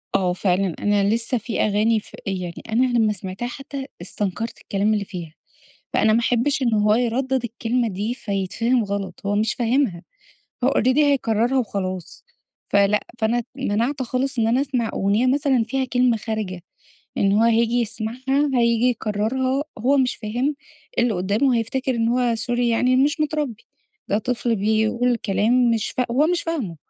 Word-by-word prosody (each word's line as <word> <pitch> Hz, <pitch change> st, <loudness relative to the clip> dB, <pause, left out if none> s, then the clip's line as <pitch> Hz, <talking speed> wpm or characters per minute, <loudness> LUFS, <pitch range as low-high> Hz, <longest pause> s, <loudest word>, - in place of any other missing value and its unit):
آه 180 Hz, -2 st, +2 dB
فعلًا، 185 Hz, -1 st, 0 dB
أنا 205 Hz, -1 st, +2 dB
لسه 235 Hz, +2 st, 0 dB
في 225 Hz, 0 st, -4 dB
أغاني 215 Hz, +2 st, +2 dB
ف -, -, -15 dB
يعني 180 Hz, -3 st, -4 dB
أنا 245 Hz, +4 st, +3 dB
لما 215 Hz, -2 st, +3 dB
سمعتها 190 Hz, +4 st, -5 dB
حتى 275 Hz, +1 st, -7 dB, 0.2 s
استنكرت 205 Hz, +4 st, -4 dB
الكلام 205 Hz, +2 st, 0 dB
اللي 205 Hz, -1 st, -1 dB
فيها، 175 Hz, -5 st, -8 dB, 0.6 s
فأنا 215 Hz, 0 st, +3 dB
ما 230 Hz, -, +3 dB
أحبش 245 Hz, +4 st, +1 dB
إن 235 Hz, -3 st, +2 dB
هو 210 Hz, 0 st, +3 dB
يردد 250 Hz, +2 st, 0 dB
الكلمة 235 Hz, +1 st, -1 dB
دي، 210 Hz, +4 st, -3 dB
فيتفهم 225 Hz, +3 st, -1 dB
غلط 200 Hz, -1 st, -4 dB
هو 205 Hz, -, +1 dB
مش 215 Hz, +1 st, +1 dB
فاهمها، 235 Hz, -7 st, 0 dB, 0.6 s
هو -, -, +4 dB
Already 255 Hz, +2 st, +2 dB
هيكررها 260 Hz, -4 st, +2 dB
وخلاص. 185 Hz, -6 st, -4 dB, 0.5 s
فلأ، 200 Hz, +1 st, +3 dB
فأنا 230 Hz, +2 st, +1 dB
ت -, -, -8 dB
مَنَعْت 260 Hz, +2 st, -1 dB
خالص 255 Hz, +2 st, -2 dB
إن 225 Hz, -, +3 dB
أنا 245 Hz, +4 st, +2 dB
أسمع 255 Hz, -5 st, -1 dB
أغنية 205 Hz, +5 st, +1 dB
مثلًا 265 Hz, -2 st, +2 dB
فيها 265 Hz, +4 st, -1 dB
كلمة 250 Hz, -2 st, +2 dB
خارجة. 215 Hz, -5 st, -4 dB, 0.5 s
لإن 195 Hz, -, +2 dB
هو 205 Hz, +2 st, +3 dB
هييجي 230 Hz, 0 st, +3 dB
يسمعها، 245 Hz, +6 st, -1 dB
هييجي 235 Hz, -1 st, +3 dB
يكررها، 250 Hz, +5 st, -1 dB
هو 265 Hz, +6 st, +2 dB
مش 255 Hz, -2 st, +1 dB
فاهم، 245 Hz, +7 st, -2 dB, 0.4 s
اللي 240 Hz, -2 st, +2 dB
قدامه 210 Hz, +8 st, +1 dB
هيفتكر 255 Hz, +3 st, -1 dB
إن 230 Hz, -1 st, +1 dB
هو 240 Hz, -1 st, +1 dB
سوري 240 Hz, +1 st, 0 dB
يعني 250 Hz, +2 st, +2 dB
مش 285 Hz, +4 st, +2 dB
مترَبّي، 295 Hz, -7 st, -2 dB, 0.4 s
ده 205 Hz, -, +1 dB
طفل 240 Hz, +1 st, -1 dB
بيقول 220 Hz, +4 st, +1 dB
كلام 230 Hz, +4 st, +2 dB
مش 225 Hz, -2 st, 0 dB
فا 250 Hz, -, 0 dB
هو 285 Hz, +5 st, +3 dB
مش 355 Hz, 0 st, +1 dB
فاهمه، 275 Hz, -, -3 dB
230 Hz, 165 wpm, -22 LUFS, 210-255 Hz, 0.6 s, هو